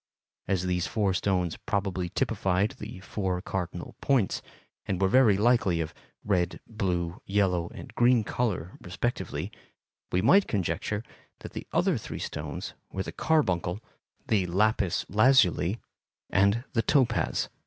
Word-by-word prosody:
As 95 -2 0
these 90 0 0
four 100 -4 +1
stones 90 -3 0
probably 95 -3 -1
typified 95 +4 0
the 105 -3 -8
four 95 -1 -2
cardinal 90 -2 -5
points, 130 -8 +2 0.5
and 95 - -1
were 95 - +3
very 110 -2 +5
likely 105 -6 +3
of 80 -1 -3 0.3
red, 90 -4 0
blue, 90 -6 -2
yellow, 95 -4 +1
and - - -10
green 120 -1 +4
color 105 -7 -2
respectively, 120 +7 -3 0.6
we 90 +1 +1
might 195 - +6
conjecture 100 +2 -1 0.4
that - - -9
the - - -6
other - - +2
three - - -6
stones - - -5 0.2
were 95 - -2
the - - -6
carbuncle, 95 - +1 0.5
the 100 -5 +2
lapis 100 0 +1
lazuli, 110 -3 +4 0.5
and 100 +5 +3
the 115 - +3
topaz. 120 0 +1
95 Hz, 130 wpm, -28 LUFS, 90-110 Hz, 0.6 s, might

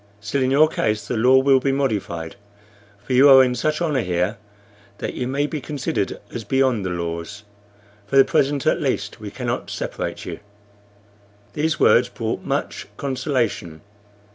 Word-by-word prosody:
Still, 110 +6 -2
in 130 - +2
your 145 +4 +5
case, 105 -8 -2
the - - -2
law 125 +4 +5
will 135 0 +4
be 135 +1 0
modified; 105 -12 -2 0.7
for 130 - -2
you 135 +3 +7
are 135 -1 +9
in 125 -1 +1
such 155 +6 -1
honor 150 -6 +1
here 90 +3 -1 0.6
that - - -4
you 125 - -3
may 140 +3 0
be 150 -1 -4
considered 140 0 -3
as 115 - -5
beyond 130 -1 +1
the 95 - -2
laws. 85 +4 -5 0.6
For 135 - -3
the 135 - +8
present, 140 -1 +1
at - - +2
least, - - -2
we - - -7
cannot - - -4
separate - - -5
you." - - -6 1.1
These 155 +1 -1
words 125 +1 +4
brought 115 -2 -4
much - - -3
consolation. 125 - -2
130 Hz, 165 wpm, -22 LUFS, 105-140 Hz, 1.1 s, are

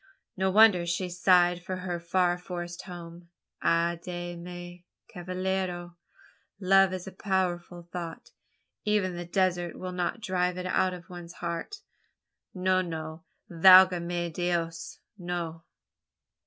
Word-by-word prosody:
No 190 0 +1
wonder 195 -4 +6
she 180 +2 -1
sighed 175 0 +3
for 185 +1 -4
her 180 -2 -4
far 175 +1 +1
forest 175 -1 -6
home. 170 -2 -10 0.3
Ay 170 0 +2
de 175 -1 -5
mi, 175 0 -9 0.2
cavallero! 185 -1 -3 0.6
Love 195 0 +5
is 185 -1 -5
a 190 - -7
powerful 180 -3 -2
thought, 170 -2 -6 0.5
even 205 -4 +1
the 175 0 -5
desert 175 -1 0
will 185 0 -5
not 180 +5 -2
drive 180 -3 -1
it 180 - -4
out 185 0 +1
of 175 -1 -12
one's 175 -1 -9
heart. 170 - -5 0.7
No, 185 0 +1
no; 160 -1 -6 0.2
valga 185 +1 +7
me 175 0 -2
dios! 170 -1 -2 0.2
no!" 170 -2 -4
175 Hz, 130 wpm, -28 LUFS, 175-185 Hz, 0.7 s, valga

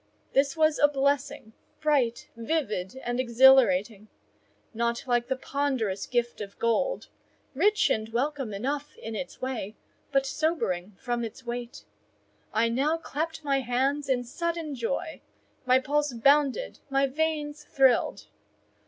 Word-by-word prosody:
This 275 +2 +2
was 310 -1 +3
a 290 - +7
blessing, 280 -5 -1 0.3
bright, 270 -6 +1
vivid, 230 - -2
and 240 +1 -2
exhilarating;—not 235 -1 +2
like 240 -2 +1
the 265 - 0
ponderous 260 -8 -2
gift 240 -2 -1
of 200 -1 -8
gold: 365 - 0 0.4
rich 405 +9 +3
and 220 0 -1
welcome 265 +1 -2
enough 280 +8 -3
in 225 0 -6
its 265 +1 -6
way, 230 -5 -3 0.4
but 275 -1 +2
sobering 210 - -1
from 240 -1 -2
its 230 +3 -7
weight. 240 0 -6 0.7
I 225 +2 +2
now 275 +8 +1
clapped 320 0 -4
my 275 -2 +1
hands 270 +3 0
in 250 -2 +1
sudden 330 +4 -3
joy—my 255 0 -2
pulse 290 +1 0
bounded, 280 - +2
my 275 0 +3
veins 295 +1 -2
thrilled. 265 -3 +2
265 Hz, 125 wpm, -27 LUFS, 235-290 Hz, 0.7 s, a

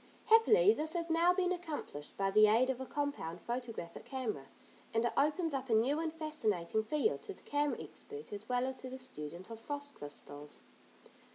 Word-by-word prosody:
Happily 450 0 +7
this 315 -4 -2
has 335 -1 -1
now 335 +2 +5
been 360 0 +1
accomplished, 310 - -5
by 195 0 +1
the 215 +1 +7
aid 240 +5 +4
of 260 0 -5
a 260 - -5
compound 285 - -2
photographic 235 -7 -5
camera, 225 - -3 0.5
and 225 +1 +3
it 240 - +1
opens 305 +2 +2
up 265 -1 -2
a 225 - +4
new 260 +8 +3
and 325 -1 -1
fascinating 220 - -1
field 300 - +1
to 405 - -6
the - - -16
camera 290 0 0
expert 435 - -9
as 205 +3 -7
well 250 0 +2
as 260 0 -3
to 255 - -6
the 260 - -6
student 180 - -8
of 225 - -7
frost 285 +3 -5
crystals. 145 - -9
260 Hz, 190 wpm, -34 LUFS, 215-315 Hz, 0.5 s, Happily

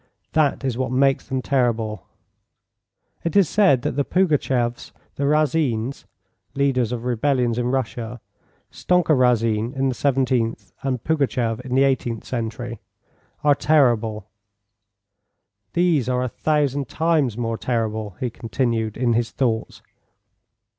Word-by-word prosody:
That 150 -3 +1
is 130 -2 -2
what 130 -2 -1
makes 135 +1 +2
them 130 -1 -2
terrible. 115 -6 0 1.2
It 170 - -2
is 200 -4 +5
said 185 -10 +3
that - - 0
the 140 +3 0
Pougatcheffs, 135 -8 0 0.2
the 140 - -2
Razins 140 -5 0 0.5
[leaders 130 -4 +1
of 120 -2 -4
rebellions 125 -1 +1
in 120 - 0
Russia: 125 -2 -3 0.5
Stonka 180 -3 +2
Razin 115 -3 +2
in 135 0 +1
the - - -1
17th 130 -4 0
and 130 -4 -2
Pougatcheff 130 -7 0
in 125 0 -4
the 135 - +5
18th 125 -4 0
century] 120 -1 -4 0.6
are 145 -1 +5
terrible. 120 -8 +2 1.5
These 170 -8 +2
are 125 0 +1
a 125 - -2
thousand 145 -2 0
times 155 -8 +1
more 115 -2 -2
terrible," 110 -5 -2
he 125 -2 -2
continued, 115 -2 -2
in 120 -1 +2
his 115 0 0
thoughts. 115 -4 -2
125 Hz, 125 wpm, -22 LUFS, 115-140 Hz, 1.5 s, is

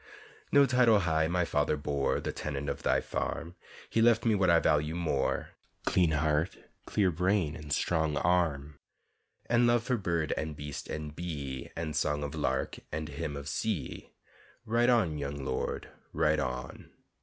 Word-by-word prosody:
No 140 0 +7
title 125 -5 +4
high 80 -2 +2
my 90 +1 +1
father 75 - +1
bore; 70 -1 0
The - - -3
tenant 70 -1 -4
of - - -4
thy - - +2
farm, 85 +1 -3 0.3
He 115 - +1
left 115 0 +4
me 115 - +4
what 95 -3 +3
I 85 - +6
value 75 +1 +1
more: 80 -6 0 0.4
Clean 90 -3 +3
heart, 75 +2 +1 0.3
clear 95 -3 +2
brain, 80 -3 0
strong 80 -1 +1
arm 75 -4 +1 0.7
And 120 0 +3
love 120 -1 +3
for 125 0 0
bird 85 -6 0
and 80 -1 -3
beast 75 0 -6
and 75 -1 -5
bee 70 -7 -5
And 80 -2 -3
song 75 -1 0
of 70 - -4
lark 65 +1 -1
and 80 +1 -3
hymn 75 0 -4
of 70 0 -7
sea, 95 +3 -3 0.6
Ride 120 +2 +3
on, 95 -12 +2
young 70 -1 -4
lord, 65 0 -3 0.2
ride 75 0 +2
on! 65 -2 -4
80 Hz, 160 wpm, -30 LUFS, 75-90 Hz, 0.7 s, No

